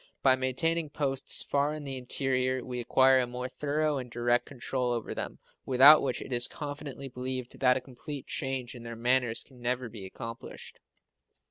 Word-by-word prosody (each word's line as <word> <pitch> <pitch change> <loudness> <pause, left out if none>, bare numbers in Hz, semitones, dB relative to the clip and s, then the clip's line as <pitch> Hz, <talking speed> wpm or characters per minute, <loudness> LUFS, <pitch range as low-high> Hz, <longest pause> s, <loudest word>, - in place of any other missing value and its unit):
By 130 -1 +6
maintaining 155 +5 0
posts 135 -3 0
far 145 +2 0
in 155 - -7
the 135 -1 -4
interior 130 0 -1
we 125 -1 -4
acquire 130 +2 +5
a 125 - 0
more 125 +1 -4
thorough 150 +2 -1
and 125 -1 -7
direct 120 +1 +1
control 125 -1 -2
over 120 -2 -2
them, - - -5 0.3
without 135 +4 +8
which 130 -3 -2
it 130 - -6
is 120 0 +2
confidently 145 -2 -6
believed 130 -1 -5
that 125 -1 +4
a - - -4
complete 135 +2 -8
change 130 -3 -3
in 120 - -10
their 115 0 -7
manners 120 0 +1
can 130 -3 -18
never 125 0 -1
be 105 -3 -9
accomplished. 115 +4 -9
130 Hz, 175 wpm, -30 LUFS, 125-140 Hz, 0.3 s, without